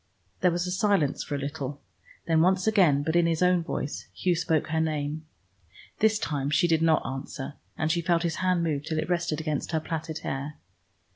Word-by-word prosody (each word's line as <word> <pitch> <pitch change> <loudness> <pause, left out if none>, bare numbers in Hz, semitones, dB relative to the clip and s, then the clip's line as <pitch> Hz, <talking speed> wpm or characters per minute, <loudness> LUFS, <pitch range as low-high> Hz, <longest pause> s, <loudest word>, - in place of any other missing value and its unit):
There 180 - +4
was 175 +1 -1
silence 200 -10 +2
for 145 - -4
a - - -1
little. 140 0 -4 0.5
Then 160 -1 +3
once 185 +2 +3
again, 180 -10 +4
but 160 +2 -1
in 175 -1 +4
his 165 +1 +1
own 180 -1 +4
voice, 150 -3 -4
Hugh 180 -2 +1
spoke 160 -2 0
her 160 0 +1
name. 155 0 -2 0.7
This 220 0 +4
time 145 -8 -2
she 175 +4 +3
did 160 -1 +2
not 160 -1 +3
answer, 135 +1 -5 0.2
and 160 0 +1
she 170 +1 +1
felt 170 0 +1
his 165 -2 -1
hand 185 -2 +1
move 150 -3 -1
till 160 +1 -3
it 155 - -2
rested 175 -3 0
against 155 +1 -3
her 160 - +2
plaited 160 0 -4
hair. 140 +3 -4
160 Hz, 200 wpm, -27 LUFS, 150-175 Hz, 0.7 s, There